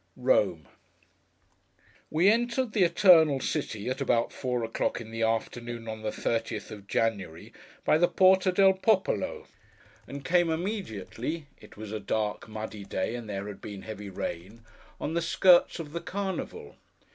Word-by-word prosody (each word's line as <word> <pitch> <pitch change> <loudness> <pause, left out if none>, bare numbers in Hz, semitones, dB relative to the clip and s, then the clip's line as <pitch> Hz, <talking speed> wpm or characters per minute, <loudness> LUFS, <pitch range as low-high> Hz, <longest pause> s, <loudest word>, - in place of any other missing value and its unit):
ROME 95 - +2 1.4
WE 165 +5 +3
entered 235 +2 +2
the 210 - +1
Eternal 165 -6 +6
City, 125 -7 -3
at 130 +2 -2
about 120 -3 +1
four 125 -2 -2
o'clock 115 +1 -1
in 110 -1 -9
the 115 0 -4
afternoon, 115 +1 -2
on 110 0 -5
the 110 0 -2
thirtieth 115 -1 -3
of 100 -2 -10
January, 100 -9 -2 0.3
by 155 - +4
the 175 - +5
Porta 185 0 +4
del 190 +1 +5
Popolo, 220 - 0 0.6
and 140 0 -8
came 175 -1 +3
immediately—it 160 - -5
was 105 -1 -7
a 110 - -3
dark, 105 +1 -2
muddy 110 -1 -6
day, 100 +2 -2
and 120 -3 -6
there 100 -1 -4
had 105 -1 -8
been 100 -2 -8
heavy 105 -2 -7
rain—on 105 - -7
the 170 - +1
skirts 175 +1 +4
of 160 -4 -7
the 170 +2 -4
Carnival. 200 - -5
125 Hz, 145 wpm, -28 LUFS, 110-175 Hz, 1.4 s, Eternal